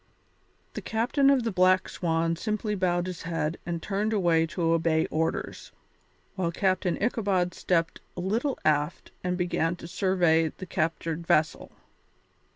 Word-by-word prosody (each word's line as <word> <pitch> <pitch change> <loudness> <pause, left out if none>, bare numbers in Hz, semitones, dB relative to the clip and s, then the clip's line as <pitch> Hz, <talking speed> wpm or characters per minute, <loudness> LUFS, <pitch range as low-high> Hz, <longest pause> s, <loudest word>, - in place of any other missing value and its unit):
The - - -5
captain 250 +5 +2
of 270 -3 +4
the 225 - -1
Black 185 0 +3
Swan 165 -1 0
simply 215 +3 -2
bowed 180 -3 0
his 180 -2 -6
head 165 -1 -2
and 170 -1 -3
turned 210 +2 -1
away 170 -5 +3
to 165 0 0
obey 160 -1 +2
orders, 160 +1 -2 0.6
while 180 -3 -1
Captain 185 -1 0
Ichabod 195 -6 0
stepped 165 -2 0 0.2
a - - -3
little 225 +10 -1
aft 150 +1 0
and 180 0 -1
began 175 -1 0
to 170 - -10
survey 175 -4 +2
the 185 - -7
captured 165 0 -2
vessel. 155 +1 +1
175 Hz, 145 wpm, -27 LUFS, 165-195 Hz, 0.6 s, of